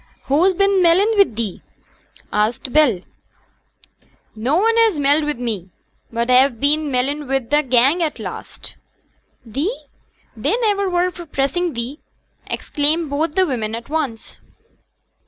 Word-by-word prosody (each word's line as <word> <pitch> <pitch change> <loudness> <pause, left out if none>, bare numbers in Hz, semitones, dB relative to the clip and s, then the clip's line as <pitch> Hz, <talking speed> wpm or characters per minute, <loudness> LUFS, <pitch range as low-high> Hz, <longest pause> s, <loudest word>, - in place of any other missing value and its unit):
'Who's 345 +7 +2
been 395 0 +3
melling 365 +6 +4
wi' 400 -1 +6
thee?' 220 - -5 0.7
asked 220 +4 -1
Bell. 280 -12 +3 1.3
'No 240 +7 0
one 450 +4 +2
has 450 -7 +3
melled 290 +2 +2
wi' 300 - 0
me; 225 -8 -4 0.4
but 235 +1 -1
a've 255 -1 +4
been 295 +2 +1
mellin' 275 +3 -1
wi' 270 +1 +2
t' 295 +5 +1
gang 265 +5 +3
at 315 -3 -1
last.' - - -8 0.7
'Thee: 290 - -3 0.5
they - - 0
niver 405 -5 0
were 355 0 +1
for 345 -1 -10
pressing 300 +5 -1
thee!' 240 +6 -5 0.5
exclaimed 305 +1 0
both 305 +2 -1
the 375 - +4
women 225 -7 -2
at 230 +3 -9
once. 285 -8 -4
290 Hz, 135 wpm, -19 LUFS, 245-350 Hz, 1.3 s, wi